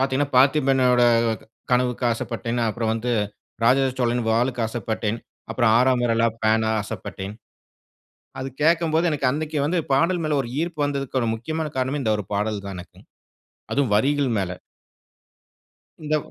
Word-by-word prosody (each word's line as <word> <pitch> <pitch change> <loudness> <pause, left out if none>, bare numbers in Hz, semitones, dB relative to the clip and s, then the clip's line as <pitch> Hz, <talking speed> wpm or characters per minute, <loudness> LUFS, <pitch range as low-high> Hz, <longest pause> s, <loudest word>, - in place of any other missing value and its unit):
பார்த்தீங்கன்னா, 135 +1 +1
பார்த்திபனோட 130 -2 +4 0.4
க - - -18 0.3
கனவுக்கு 125 0 +1
ஆசைப்பட்டேன், 115 +1 -3
அப்பறம் 110 0 -1
வந்து 120 +2 -2 0.5
ராஜராஜ 130 +2 +4
சோழன் 120 -1 +1
வாளுக்கு 120 +1 +1
ஆசைப்பட்டேன். 110 -1 -3 0.3
அப்பறம் 115 -3 +3
ஆறாம் 125 0 +3
விரலா 115 0 +2
பேனா 110 0 +2
ஆசைப்பட்டேன். 100 -1 -6 1.0
அது 130 +1 -3
கேட்கம்போது 165 +1 +3
எனக்கு 140 -4 +1
அன்னைக்கு 155 +1 -2
வந்து 170 +4 +1
பாடல் 170 +6 +2
மேல 155 -1 0
ஒரு 120 - -7
ஈர்ப்பு 165 -3 -3
வந்ததுக்கு 140 -2 -2
ஒரு 115 - 0
முக்கியமான 155 +7 -3
காரணமே 130 +3 -1
இந்த 110 -2 +1
1 105 - -5
பாடல் 105 0 -1
தான் 100 -2 -6
எனக்கும். 90 - -13 0.7
அதுவும் 135 -7 +1
வரிகள் 140 +2 +2
மேல. 95 -2 -1 1.5
இந்த 155 0 +1
125 Hz, 140 wpm, -23 LUFS, 115-145 Hz, 1.5 s, பார்த்திபனோட